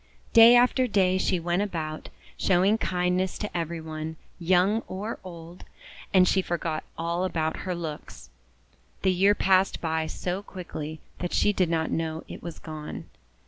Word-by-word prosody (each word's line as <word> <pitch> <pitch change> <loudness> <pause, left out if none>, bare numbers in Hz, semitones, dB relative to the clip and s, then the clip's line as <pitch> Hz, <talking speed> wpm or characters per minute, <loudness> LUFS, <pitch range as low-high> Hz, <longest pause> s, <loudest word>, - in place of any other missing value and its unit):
Day 230 +1 +9
after 250 +1 +4
day 190 -4 +2
she 185 -1 +1
went 175 +3 0
about, 160 -6 -4 0.3
showing 195 +4 +3
kind 180 -2 0
ness 185 0 -1
to 210 - -5
every 170 0 -2
one, 160 0 -6 0.2
young 185 +5 +3
or 205 +4 -5
old; 170 -1 -10 0.5
and 185 -1 +5
she 190 - +3
forgot 170 -3 -3
all 170 +2 -1
about 160 -4 -1
her 180 - -1
looks. 150 - -7 0.7
The 190 - +4
year 195 +3 +4
passed 190 0 +3
by 160 -1 -1
so 180 +4 -3
quickly 160 -6 -7 0.2
that 175 - -3
she 205 - +3
did 185 -4 +1
not 160 -1 0
know 160 0 -2
it - - -9
was 170 -1 -7
gone. 155 -2 -8
175 Hz, 160 wpm, -26 LUFS, 160-190 Hz, 0.7 s, Day